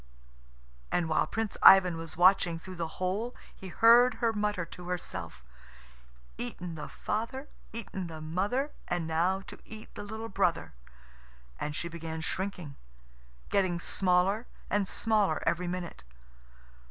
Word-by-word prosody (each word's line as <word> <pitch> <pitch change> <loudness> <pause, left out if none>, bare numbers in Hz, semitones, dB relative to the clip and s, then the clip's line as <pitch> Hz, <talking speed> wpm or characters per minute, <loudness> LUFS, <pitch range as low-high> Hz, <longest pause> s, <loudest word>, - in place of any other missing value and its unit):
And 170 - +1
while 155 - +2
Prince 225 -2 -3
Ivan 185 -3 +8
was 165 -1 -6
watching 180 -1 +5
through 185 +2 -9
the 165 -1 -2
hole 200 +7 -2 0.2
he 190 - -9
heard 235 +6 +6
her 230 -2 +1
mutter 210 -4 -1
to 175 +1 -10
herself, 175 - -5 1.0
"Eaten 170 +8 -5
the 150 -2 -7
father, 230 +6 -3 0.2
eaten 195 -5 -5
the 160 -1 -8
mother, 200 - -1 0.2
And 175 -2 -1
now 170 +4 +1
to - - -11
eat 220 0 -11
the - - -7
little 220 +2 -6
brother" 190 -6 0 0.9
And 150 - -3
she 170 - -3
began 165 -1 -5
shrinking, 180 -5 -4 0.7
getting 185 -3 +1
smaller 190 +5 +1 0.2
and 205 -2 +2
smaller 210 -8 +1
every 170 +2 +1
minute. 175 - -5
185 Hz, 135 wpm, -30 LUFS, 170-210 Hz, 1.0 s, Ivan